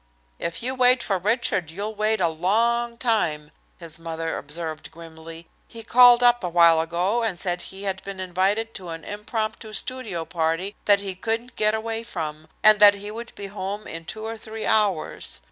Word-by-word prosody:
"If 170 +5 -3
you 255 +2 -1
wait 255 -1 +5
for 195 -3 -1
Richard, 205 -4 +1
you'll 200 +6 -5
wait 215 +1 +1
a 175 - +2
long 230 +8 0
time," 165 -11 -1 0.3
his 165 -2 -7
mother 165 0 -4
observed 155 +1 -4
grimly. 165 0 -12 0.2
"He 230 -1 -9
called 245 +1 +6
up 240 -1 +4
a 180 - -2
while 170 -1 +5
ago, 175 +8 -1
and 220 -6 -1
said 175 0 -2
he 190 +1 -7
had 190 -1 -3
been 195 -1 -7
invited 190 +5 0
to 185 -3 -7
an 165 0 -7
impromptu 215 +1 -5
studio 215 -7 -2
party 165 +4 -2
that 200 -1 +4
he 195 -1 -2
couldn't 225 +5 -3
get 215 0 +2
away 225 +1 -2
from, 155 -8 -6 0.2
and 215 -1 +7
that 205 -1 +8
he 205 +1 -6
would 230 +2 -9
be 200 - -6
home 200 +1 -6
in 165 0 -7
two 215 +5 -5
or 225 0 -5
three 220 0 -7
hours. 200 -7 0
200 Hz, 185 wpm, -23 LUFS, 170-225 Hz, 0.3 s, that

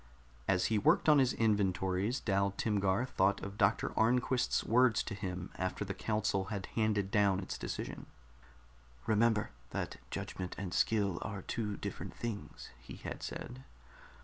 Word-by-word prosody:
As 95 -2 +3
he 110 -2 +2
worked - - +3
on 150 -2 +7
his 130 -2 +3
inventories, 100 +1 +1
Dal 100 -1 +1
Timgar 100 +1 +1
thought 100 -5 +2
of 100 0 -5
Doctor 100 +1 +3
Arnquist's 125 +2 +2
words 120 -1 +4
to 110 - -5
him 90 -3 -5
after 95 +3 -2
the 100 - -3
council 105 -3 0
had 100 -2 -4
handed 105 -3 +1
down 100 -3 +3
its 95 - -4
decision. - - -5 1.0
"Remember 110 0 +2 0.2
that - - -4
judgment 90 -1 -5
and 95 -2 -4
skill 100 -5 +2
are 100 -4 -5
two 105 -3 -3
different - - -6
things," 115 -4 -6
he 65 - -10
had - - -7
said. 130 +2 -6
100 Hz, 145 wpm, -33 LUFS, 95-115 Hz, 1.0 s, on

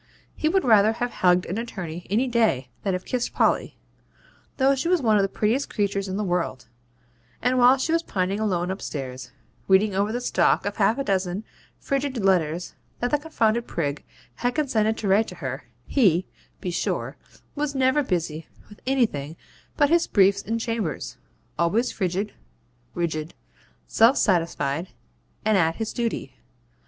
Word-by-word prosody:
He 310 - 0
would 380 -1 +1
rather 220 -2 +5
have 240 +1 -3
hugged 180 0 +3
an 195 +6 -3
attorney 180 -7 -6
any 230 +7 +2
day 220 - +1
than 195 - -1
have 180 0 -3
kissed 250 -1 -2
Polly, - - +1 0.8
though 270 +1 +4
she 275 +5 -2
was 360 0 +3
one 220 -6 +3
of - - +4
the 195 - 0
prettiest 225 +8 0
creatures 200 -1 -1
in 190 +1 -3
the 210 - -1
world; 175 - -2 0.7
and 250 +1 +1
while 250 +2 +6
she 285 +5 -1
was 330 0 +3
pining 195 - -2
alone 185 -4 0
upstairs, 130 -9 -6 0.4
reading 195 +2 +4
over 200 +3 0
the 240 - -2
stock 245 - +2
of 205 - -3
half 215 +2 +3
a 275 - -1
dozen 190 -2 -1 0.3
frigid 275 -2 -2
letters 180 -5 +1 0.3
that 245 - -1
the 295 - +2
confounded 235 -7 0
prig 145 -3 -3 0.3
had 245 +1 -1
condescended 225 -8 +1
to 210 - -3
write 205 +3 +3
to 180 - -8
her, 130 -5 -5 0.2
HE, 190 - +3 0.4
be 180 - -3
sure, 170 - -2 0.4
was 290 -1 -2
never 265 +2 +3
busy 165 - -2 0.2
with 210 - -14
anything 190 - 0 0.4
but 290 0 +3
his 340 0 +3
briefs 200 0 +4
in 225 +2 -2
chambers 205 - -3 0.4
always 210 +9 +2
frigid, 195 +2 -2 0.6
rigid, 160 -2 -3 0.5
self 230 - +4
satisfied, 165 -4 +1 0.6
and 215 -2 +4
at 165 -1 +2
his 225 -1 -4
duty. 230 - -3
205 Hz, 165 wpm, -24 LUFS, 175-245 Hz, 0.8 s, while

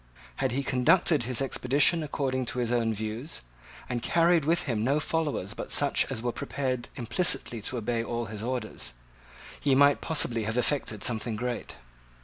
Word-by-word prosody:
Had - - 0
he 140 +2 0
conducted 145 +1 +3
his 130 +1 0
expedition 140 +5 +3
according 130 -4 -2
to 125 - -4
his 120 -1 0
own 115 -2 +2
views, 110 +7 -3 0.4
and 120 -2 -2
carried 170 0 +3
with 165 +2 +2
him 115 -6 -1
no 140 +5 +2
followers 150 - -1
but - - -6
such 145 -1 +2
as 120 -4 -4
were 120 - 0
prepared 130 -2 -3
implicitly 120 -3 0
to 125 +4 -3
obey 115 0 -1
all 120 0 -3
his 110 -2 -7
orders, 120 - -4 0.7
he 140 -2 +2
might 140 +1 +5
possibly 120 -8 +2
have 110 +2 -2
effected 125 -5 -1
something 115 -1 0
great. 120 +2 -4
125 Hz, 165 wpm, -28 LUFS, 115-145 Hz, 0.7 s, might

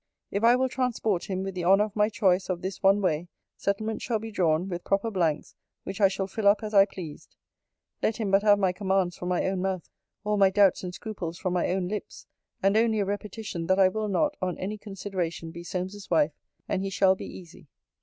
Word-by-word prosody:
'If 200 - -2
I 235 +1 +7
will 260 +1 +2
transport 240 -7 -1
him 190 -1 -3
with 195 0 -4
the 180 -1 -4
honour 195 +4 +5
of 210 -1 -5
my 210 0 +3
choice 190 -3 +1
of 180 -1 -2
this 190 +1 -4
one 195 +1 +4
way, 165 -1 0 0.3
settlements 215 +2 -2
shall 230 - 0
be 225 +1 -7
drawn, 175 -3 +1
with 175 -2 -5
proper 200 +3 0
blanks, 165 -6 -1 0.3
which 195 - -6
I 195 - +8
shall 195 0 -2
fill 200 +2 -1
up 200 +1 +4
as 215 0 -5
I 195 -1 +7
pleased. 175 -6 -10 0.7
Let 220 - 0
him 215 -4 -2
but 195 +1 +5
have 205 -1 +5
my 190 -2 +2
commands 190 -1 0
from 180 - -5
my 180 - +1
own 190 -1 -1
mouth, 190 -2 -2 0.4
all 210 0 0
my 195 -1 +6
doubts 195 -1 +3
and 180 - -4
scruples 180 -4 -6
from 185 -2 -2
my 180 - +1
own 185 0 0
lips; 210 +1 -6 0.4
and 195 +1 +3
only 220 -1 +3
a 200 - +1
repetition, 205 -3 -4
that 185 - +3
I 190 -1 +6
will 215 +2 -2
not, 295 +9 +1
on 185 -1 -2
any 210 +3 -4
consideration, 185 -5 -4
be 170 +1 -9
Solmes's 190 +3 -5
wife; 160 -3 +3 0.3
and 190 - -1
he 195 - -2
shall 190 0 +4
be - - -7
easy. 175 -3 -12
195 Hz, 225 wpm, -27 LUFS, 180-210 Hz, 0.7 s, I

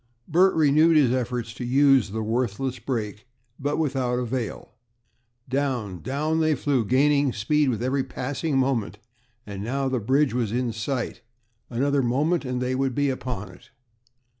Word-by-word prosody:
Bert 180 +4 +4
renewed 155 +1 +5
his 135 -5 +4
efforts 125 -2 -2
to 125 - -7
use 135 -2 +4
the 110 +2 -3
worthless 125 +3 -2
brake, 110 -3 -4 0.3
but 145 +2 -1
without 130 -5 0
avail. 125 -2 -4 0.8
Down, 125 -9 -2
down, 150 +4 -1
they 155 -1 +2
flew, 135 -2 0
gaining 140 +4 +3
speed 145 +6 +1
with 115 -2 -2
every 135 +1 0
passing 140 +4 -3
moment, 130 -6 0 0.5
and 100 -1 -6
now 135 +4 -1
the 130 -1 0
bridge 130 +5 +2
was 120 -4 -1
in 120 0 -1
sight. 120 +1 -3 0.5
Another 140 +3 +1
moment, 145 +7 +1
and 125 -1 -2
they 125 +1 -1
would 130 -1 -1
be 145 -1 +1
upon 125 -5 -5
it. - - -18
130 Hz, 155 wpm, -25 LUFS, 120-140 Hz, 0.8 s, renewed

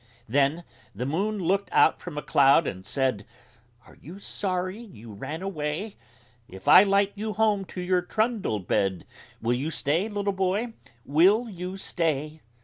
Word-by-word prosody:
Then 140 +7 +1 0.3
the 125 +5 -3
Moon 195 +10 -1
looked 195 +2 0
out - - +4
from 170 -4 -8
a 150 - -3
cloud 140 +3 +4
and 95 -6 -5
said: 130 -1 -1 0.6
"Are - - -18
you 170 +7 -10
sorry 185 0 -3
you 115 - -12
ran 155 - -6
away? 185 +3 -4 0.5
If 95 +1 -12
I - - +10
light 200 0 +2
you 215 +1 -4
home 210 -3 +1
to 180 - -7
your 180 0 +1
trundle 215 - -1
bed, 95 -1 -1 0.4
Will 120 +1 +2
you 135 +6 -2
stay, 165 +6 0
little 205 -1 -2
boy, 195 +5 -1 0.3
will 190 - +4
you 185 -1 -6
stay?" 155 -4 -2
180 Hz, 155 wpm, -26 LUFS, 140-200 Hz, 0.6 s, I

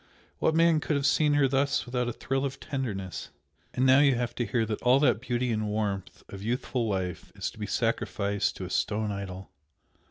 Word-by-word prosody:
What 160 - +2
man 165 -1 +5
could 150 - -1
have 140 -1 0
seen 150 +1 +3
her 140 -2 +4
thus 135 +1 +1
without 125 0 -1
a - - -1
thrill 135 +3 -2
of 140 0 -3
tenderness! 105 - -4 0.4
and 130 - +1
now 130 +1 +7
you 140 -3 +5
have 120 0 -2
to 120 -1 -2
hear 115 +1 +1
that 110 -1 -3
all 125 +2 +5
that 140 -6 +3
beauty 125 -1 -1
and 110 -1 -1
warmth 105 -3 -3
of 100 - -9
youthful 120 +1 -1
life 95 -3 -3
is - - -3
to - - -16
be - - -3
sacrificed 100 0 0
to - - -6
a - - -7
stone 105 0 0
idol! 95 -2 -6
120 Hz, 210 wpm, -28 LUFS, 105-135 Hz, 0.4 s, now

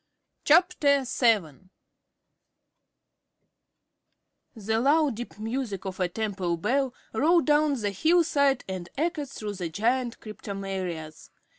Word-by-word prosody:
_ - - -50
CHAPTER 295 -4 +4
VII 210 - 0 2.9
The 220 +1 -1
low, 290 +3 +3
deep 235 -2 -8
music 220 -3 -4
of 190 0 -5
a 180 -1 +1
temple 190 -4 -2
bell 255 +8 0 0.2
rolled 325 +8 +3
down 295 -2 +3
the 205 -2 -1
hillside 285 - +2
and 185 -2 -5
echoed 305 -2 -1
through 210 -5 -6
the 180 -4 -4
giant 235 +7 -1
cryptomerias. 190 -7 -6
225 Hz, 110 wpm, -27 LUFS, 195-280 Hz, 2.9 s, CHAPTER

